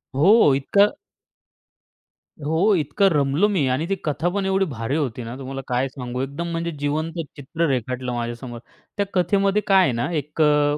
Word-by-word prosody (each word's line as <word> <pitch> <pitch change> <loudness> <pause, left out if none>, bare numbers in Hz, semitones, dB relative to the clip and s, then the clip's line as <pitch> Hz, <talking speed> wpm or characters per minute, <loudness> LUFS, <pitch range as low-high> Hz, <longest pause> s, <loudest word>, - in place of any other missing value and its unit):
हो. 165 0 +6
इतकं 200 +10 +3 1.5
हो. 165 +8 +3
इतकं 155 +4 +2
रमलो 145 +5 +2
मी, 175 -9 +1
आणि 130 +5 0
ती 195 - +1
कथा 160 +3 0
पण 200 -1 -1
एवढी 195 0 +2
भारी 115 +4 -3
होती, 130 -6 -2
ना. 115 +2 -7
तुम्हाला 135 0 -6
काय 125 +2 0
सांगू, 125 -1 -5
एकदम 140 +6 -4
म्हणजे 170 0 -2
जिवंत 155 +3 -2 0.2
चित्र 160 +4 -2
रेखाटलं 125 0 -2
माझ्यासमोर. 120 0 -5 0.4
त्या 200 - +1
कथेमध्ये 195 +3 +2
काय 195 -1 +6
आहे 135 - +2
ना, 120 +7 -1
एक 150 0 -3
अ, 150 -1 +3
150 Hz, 165 wpm, -22 LUFS, 130-175 Hz, 1.5 s, हो